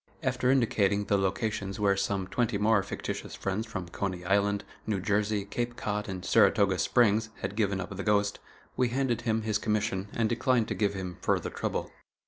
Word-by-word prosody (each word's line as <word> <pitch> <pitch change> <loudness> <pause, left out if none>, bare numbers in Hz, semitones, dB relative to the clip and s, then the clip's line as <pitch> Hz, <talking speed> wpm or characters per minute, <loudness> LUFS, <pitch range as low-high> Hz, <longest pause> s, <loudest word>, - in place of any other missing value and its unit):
After 130 -1 +1
indicating 105 -6 +2
the 100 - +2
locations 100 0 -1
where 100 -1 +3
some 100 -1 -1
twenty 110 +2 0
more 105 0 +3
fictitious - - -5
friends 100 +4 -2
from 95 -6 -5
Coney 90 -1 -3
Island, 100 +1 +2 0.2
New 105 -3 0
Jersey, 100 +1 0
Cape 120 +4 -3
Cod 105 -3 -3
and 95 -1 -5
Saratoga 95 -3 +4
Springs, 110 -2 +3
had 100 - -3
given 100 -3 +1
up 95 +2 -5
the 100 - -4
ghost, 105 0 +1 0.4
we 125 - +2
handed 125 -1 0
him 110 -1 0
his 105 -2 0
commission 105 -3 -1
and 115 -1 +1
declined 120 0 +2
to - - 0
give 100 -2 0
him 90 -2 -5
further - - 0
trouble. - - -3
105 Hz, 180 wpm, -29 LUFS, 100-110 Hz, 0.4 s, Saratoga